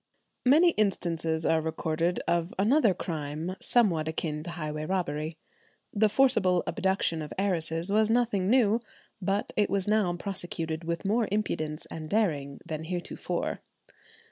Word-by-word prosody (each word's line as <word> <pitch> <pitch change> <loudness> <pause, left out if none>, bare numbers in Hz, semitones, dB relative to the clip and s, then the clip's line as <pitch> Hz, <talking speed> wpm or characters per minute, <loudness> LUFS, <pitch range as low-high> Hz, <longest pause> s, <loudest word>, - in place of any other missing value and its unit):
Many 325 +6 +6
instances 165 - -1
are 160 0 +3
recorded 160 +2 -1
of 170 +1 0
another 225 +4 +4
crime 160 +1 -4
somewhat 180 -10 +2
akin 155 -1 -2
to 165 - -7
highway 155 -2 -4
robbery. 160 -4 -2 0.6
The 215 0 +3
forcible 205 -8 +3
abduction 190 -4 0
of 150 - -7
heiresses 175 -2 +1
was 215 +1 +3
nothing 225 -5 +2
new; 230 -2 +4 0.4
but 195 +2 -1
it 210 - +2
was 195 -1 0
now 210 -4 +2
prosecuted 170 -3 -4
with 170 +3 -3
more 220 +3 +2
impudence 155 -7 -2
and 155 -1 -6
daring 150 -10 0
than 160 0 -5
heretofore. 175 +1 -3
175 Hz, 135 wpm, -28 LUFS, 160-210 Hz, 0.6 s, Many